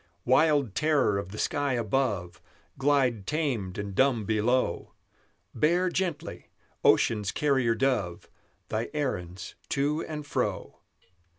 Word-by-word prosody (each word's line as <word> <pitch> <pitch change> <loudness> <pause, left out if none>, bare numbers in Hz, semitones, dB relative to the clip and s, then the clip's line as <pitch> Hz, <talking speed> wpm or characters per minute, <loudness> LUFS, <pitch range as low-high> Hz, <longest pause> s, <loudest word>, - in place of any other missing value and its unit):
Wild 140 -3 +3
terror 145 -8 +2
of 95 - -6
the 105 - -8
sky 145 +1 0
above, 105 -7 -1 0.3
Glide 135 -7 +1
tamed 130 - -2
and 100 -1 -4
dumb 120 -1 +2
below! 110 -1 0 0.6
Bear 175 +4 +2
gently, 170 -3 -3 0.3
Ocean's 105 -3 +3
carrier 130 -6 +1
dove, 110 -9 -1 0.4
Thy 110 +2 -2
errands 90 - -3 0.2
to 145 +3 0
and 150 -2 -5
fro. - - -3
130 Hz, 110 wpm, -28 LUFS, 105-145 Hz, 0.6 s, Wild